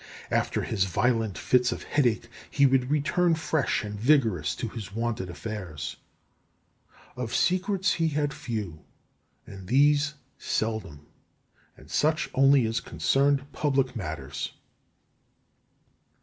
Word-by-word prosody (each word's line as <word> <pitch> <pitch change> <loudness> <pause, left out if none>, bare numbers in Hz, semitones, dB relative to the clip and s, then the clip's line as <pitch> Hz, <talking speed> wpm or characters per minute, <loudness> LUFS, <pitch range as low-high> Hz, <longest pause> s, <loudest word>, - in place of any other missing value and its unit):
After - - 0
his 100 -4 0
violent 110 +1 0
fits 125 0 +2
of - - -5
headache 120 -5 +1 0.2
he 140 - +3
would 130 -1 +3
return 165 +4 +2
fresh 160 -8 0
and 105 -1 -6
vigorous 115 - +2
to - - -4
his 105 -4 -8
wonted 115 -5 -2
affairs. 90 -5 -6 1.2
Of 125 -2 -4
secrets 190 +2 +2
he 165 -1 +1
had 145 -1 -1
few, 105 - -5 0.6
and 95 -2 -11
these 145 +4 +3 0.2
seldom, 110 -10 -3 0.7
and - - -16
such 155 +1 +1
only 135 -1 +5
as 115 +1 0
concerned 140 +3 +1
public 135 -3 0
matters. 75 - -5
125 Hz, 115 wpm, -27 LUFS, 105-145 Hz, 1.2 s, only